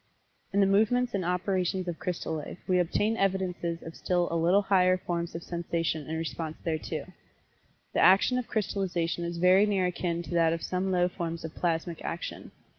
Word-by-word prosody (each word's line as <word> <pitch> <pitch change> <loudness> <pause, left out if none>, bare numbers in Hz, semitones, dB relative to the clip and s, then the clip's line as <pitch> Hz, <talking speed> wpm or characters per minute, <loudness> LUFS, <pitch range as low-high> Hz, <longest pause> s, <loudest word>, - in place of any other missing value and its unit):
In 200 - +3
the - - +6
movements 220 +5 +2
and 195 -2 0
operations 180 +1 0
of 170 -2 -4
crystal 180 -3 -3
life 150 - -7
we 185 -1 +3
obtain 205 +6 +1
evidences 185 -4 -1
of 165 - -8
still 175 -1 0
a - - -1
little 175 +5 +3
higher 185 -2 +4
forms 170 -2 -3
of 165 - -5
Sensation 165 -3 -2
and 160 - -2
response 160 -1 -4
thereto. 160 -2 -3 0.9
The - - +1
action 200 +7 +5
of 250 - -5
crystallization 175 -6 -1
is 170 0 -3
very 185 +4 +5
near 195 -3 +1
akin 175 -1 -2
to - - -10
that 165 -1 +3
of 165 - -4
some 185 +1 -1
low 180 -1 +3
forms 170 -2 -4
of 160 - -7
plasmic 170 -1 -2
action. 170 - -5
180 Hz, 185 wpm, -29 LUFS, 170-190 Hz, 0.9 s, the